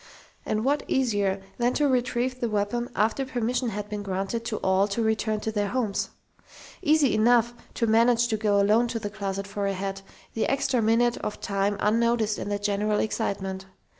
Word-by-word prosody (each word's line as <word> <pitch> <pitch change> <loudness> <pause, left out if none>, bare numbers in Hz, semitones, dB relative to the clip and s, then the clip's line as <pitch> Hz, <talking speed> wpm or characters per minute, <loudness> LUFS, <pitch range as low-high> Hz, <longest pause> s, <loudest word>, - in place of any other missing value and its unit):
And 215 +2 0
what 285 +2 +2
easier 205 -7 0 0.2
than 245 +1 +1
to 295 - +3
retrieve 250 0 0
the 235 - -1
weapon 215 +3 -1
after 220 +6 +1
permission 245 -1 -1
had 210 -1 -5
been 210 -1 -4
granted 195 +4 -3
to 220 -2 -2
all 190 +1 +3
to 210 +3 -1
return 220 -1 0
to 220 - -2
their 205 -1 0
homes? 220 -3 -1 0.7
Easy 305 -6 +3
enough 235 +2 +3 0.2
to 230 - +1
manage 230 +1 +4
to 220 - 0
go 210 -1 +2
alone 215 +4 +4
to 235 0 -3
the 205 -2 -5
closet 200 -1 -4
for 200 0 -3
a 195 - 0
hat, 195 +1 -4 0.3
the 225 - 0
extra 265 -3 +1
minute 230 +2 +2
of 210 - -5
time 200 0 -1
unnoticed 225 0 +1
in - - -4
the 205 - 0
general 210 +1 0
excitement. 190 -3 -2
220 Hz, 185 wpm, -26 LUFS, 205-240 Hz, 0.7 s, manage